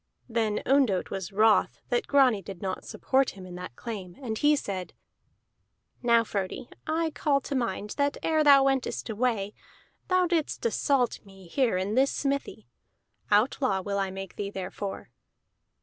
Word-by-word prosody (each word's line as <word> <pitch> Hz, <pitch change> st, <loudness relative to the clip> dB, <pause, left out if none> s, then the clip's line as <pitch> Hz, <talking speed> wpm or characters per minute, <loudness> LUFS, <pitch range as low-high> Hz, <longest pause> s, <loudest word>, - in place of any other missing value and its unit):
Then 225 Hz, -3 st, 0 dB
Ondott 260 Hz, -9 st, +2 dB
was 195 Hz, 0 st, -4 dB
wroth 215 Hz, +2 st, +3 dB
that 480 Hz, -3 st, 0 dB
Grani 260 Hz, -7 st, +4 dB
did 190 Hz, -1 st, -9 dB
not 190 Hz, 0 st, -4 dB
support 265 Hz, 0 st, +1 dB
him 185 Hz, -, -9 dB
in 180 Hz, -, -9 dB
that 180 Hz, -7 st, -8 dB
claim, 195 Hz, -, -7 dB
and 235 Hz, -5 st, -4 dB
he 295 Hz, +6 st, +4 dB
said: 190 Hz, -9 st, -5 dB, 1.1 s
"Now, 235 Hz, -2 st, +4 dB
Frodi, 200 Hz, +2 st, -4 dB, 0.2 s
I 320 Hz, +1 st, 0 dB
call 285 Hz, -2 st, +1 dB
to 280 Hz, -, -5 dB
mind 210 Hz, -5 st, -2 dB
that 285 Hz, -1 st, +1 dB
ere 315 Hz, -1 st, +2 dB
thou 280 Hz, -2 st, +7 dB
wentest 270 Hz, -3 st, 0 dB
away, 215 Hz, -3 st, 0 dB, 0.5 s
thou 370 Hz, -1 st, +3 dB
didst 330 Hz, -7 st, -1 dB
assault 245 Hz, +3 st, +1 dB
me 195 Hz, -2 st, -15 dB
here 235 Hz, +1 st, +1 dB
in 190 Hz, +3 st, -1 dB
this 265 Hz, +3 st, +4 dB
smithy. 280 Hz, 0 st, -2 dB, 0.6 s
Outlaw 210 Hz, -1 st, +2 dB
will 200 Hz, +1 st, -2 dB
I 195 Hz, -1 st, 0 dB
make 195 Hz, 0 st, -8 dB
thee 200 Hz, -1 st, -3 dB
therefor." 195 Hz, +1 st, -6 dB
225 Hz, 155 wpm, -28 LUFS, 195-275 Hz, 1.1 s, thou